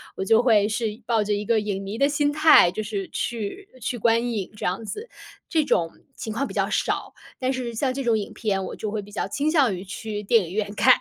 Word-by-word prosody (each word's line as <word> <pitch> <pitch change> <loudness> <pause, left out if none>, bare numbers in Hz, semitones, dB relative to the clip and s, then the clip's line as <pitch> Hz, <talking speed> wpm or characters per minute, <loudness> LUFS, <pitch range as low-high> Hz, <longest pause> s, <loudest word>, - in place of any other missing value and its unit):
我 190 - -3
就 225 +3 +4
会 215 -4 +4
是 220 +1 -2
抱 225 -3 +2
着 210 0 0
一 205 +1 -1
个 220 +1 +2
影 200 -2 -3
迷 200 +3 -5
的 280 - +4
心 290 0 +1
态， 305 - +7
就 215 +3 -4
是 205 -2 -4
去 235 - -4
去 245 - -2
观 230 +2 +2
影 200 -4 -3
这 205 - -3
样 190 +5 -2
子。 430 - -6 0.4
这 315 -3 +2
种 165 -11 +1 0.3
情 220 - -5
况 260 +6 -1
比 - - -9
较 - - 0
少， - - -1 0.3
但 260 0 0
是 250 -3 -3
像 260 +3 0
这 270 +1 -3
种 230 -2 +3
影 205 - -5
片， 195 -3 -1
我 - - -6
就 215 -2 -4
会 215 -1 -2
比 205 - -13
较 205 - -2
倾 290 +2 0
向 275 - +3
于 180 - -7
去 210 +2 -5
电 210 -2 +3
影 175 - -8
院 205 -1 -1
看。 255 +3 +7
220 Hz, 265 characters per minute, -24 LUFS, 205-255 Hz, 0.4 s, 态